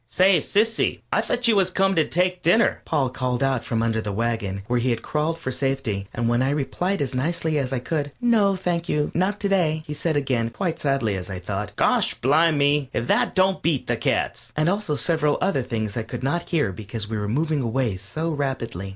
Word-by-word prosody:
"Say, 185 Hz, +8 st, +4 dB
Sissy, 225 Hz, +2 st, +1 dB
I -, -, +3 dB
thought 245 Hz, 0 st, 0 dB
you 225 Hz, -, +4 dB
was 190 Hz, -2 st, +3 dB
comin' 195 Hz, +1 st, +1 dB
to 160 Hz, -, +3 dB
take 180 Hz, +1 st, 0 dB
dinner," 220 Hz, +8 st, +3 dB
Pop 135 Hz, -5 st, 0 dB
called 125 Hz, 0 st, -1 dB
out 135 Hz, -3 st, +1 dB
from 115 Hz, -1 st, -1 dB
under 115 Hz, -1 st, 0 dB
the 105 Hz, -, -4 dB
wagon, 105 Hz, -3 st, -2 dB
where 125 Hz, +2 st, 0 dB
he 125 Hz, +2 st, 0 dB
had 115 Hz, -1 st, -1 dB
crawled 155 Hz, +2 st, -1 dB
for 130 Hz, -6 st, -4 dB
safety, 130 Hz, -7 st, -2 dB
and 120 Hz, 0 st, -2 dB
when 120 Hz, +1 st, +2 dB
I 130 Hz, -, +2 dB
replied 150 Hz, +5 st, -1 dB
as 135 Hz, -1 st, -4 dB
nicely 155 Hz, +3 st, 0 dB
as 130 Hz, -2 st, -2 dB
I 135 Hz, -, 0 dB
could, 145 Hz, +3 st, -2 dB
"No, 220 Hz, -5 st, +3 dB
thank 175 Hz, -2 st, -2 dB
you, 150 Hz, 0 st, 0 dB
not 195 Hz, +4 st, 0 dB
to 200 Hz, -, +1 dB
day," 160 Hz, -5 st, +1 dB
he 150 Hz, -, -5 dB
said 155 Hz, +1 st, -1 dB
again, 125 Hz, -5 st, 0 dB
quite 165 Hz, +5 st, -3 dB
sadly 135 Hz, -8 st, 0 dB
as 90 Hz, 0 st, -5 dB
I 95 Hz, -, -4 dB
thought, 100 Hz, +3 st, -5 dB
"Gosh -, -, +2 dB
blim 155 Hz, +4 st, +3 dB
me, 145 Hz, -1 st, +2 dB
if 115 Hz, -, -1 dB
that -, -, +1 dB
don't 190 Hz, 0 st, +2 dB
beat 160 Hz, -6 st, 0 dB
the -, -, 0 dB
cats!" -, -, -1 dB
and 155 Hz, +1 st, +2 dB
also 195 Hz, -5 st, 0 dB
several 150 Hz, -2 st, +2 dB
other 185 Hz, -7 st, +1 dB
things 110 Hz, -4 st, -3 dB
I 115 Hz, -, -1 dB
could 110 Hz, +3 st, -7 dB
not 170 Hz, +6 st, -1 dB
hear 150 Hz, -, +1 dB
because 105 Hz, +3 st, -6 dB
we 110 Hz, 0 st, -3 dB
were 105 Hz, -, -3 dB
moving 150 Hz, +6 st, 0 dB
away 120 Hz, -3 st, 0 dB
so 160 Hz, -, -4 dB
rapidly. 125 Hz, -, -3 dB
140 Hz, 225 wpm, -23 LUFS, 115-170 Hz, -, Say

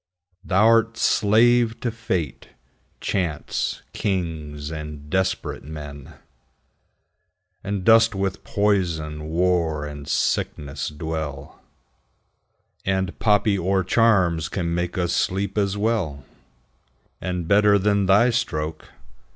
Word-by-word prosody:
Thou'rt 115 Hz, +4 st, +3 dB
slave 115 Hz, +2 st, +3 dB
to 120 Hz, -, -1 dB
fate, 85 Hz, -, -3 dB, 0.5 s
chance, 85 Hz, -6 st, -2 dB
kings, 80 Hz, -6 st, -3 dB
and 75 Hz, -2 st, -7 dB
desperate 95 Hz, 0 st, -1 dB
men, 75 Hz, 0 st, -9 dB, 1.5 s
And 100 Hz, -1 st, -3 dB
dost 115 Hz, 0 st, +5 dB
with 95 Hz, -1 st, -2 dB
poison, 85 Hz, -7 st, 0 dB
war, 85 Hz, -3 st, +1 dB
and 75 Hz, -1 st, -8 dB
sickness 70 Hz, -1 st, -1 dB
dwell; 75 Hz, -2 st, -6 dB, 1.2 s
10 95 Hz, -, +1 dB
And 95 Hz, -2 st, -3 dB
poppy 105 Hz, -2 st, +3 dB
or 95 Hz, +1 st, +1 dB
charms 90 Hz, -7 st, +2 dB
can 85 Hz, -3 st, -2 dB
make 85 Hz, +1 st, -2 dB
us 90 Hz, -2 st, 0 dB
sleep 100 Hz, +2 st, -1 dB
as 100 Hz, -1 st, 0 dB
well 100 Hz, -, -1 dB, 1.0 s
And 90 Hz, -2 st, -3 dB
better 100 Hz, +1 st, +5 dB
than 100 Hz, 0 st, +1 dB
thy 110 Hz, +6 st, +5 dB
stroke. 80 Hz, -10 st, -2 dB
90 Hz, 100 wpm, -23 LUFS, 75-105 Hz, 1.5 s, dost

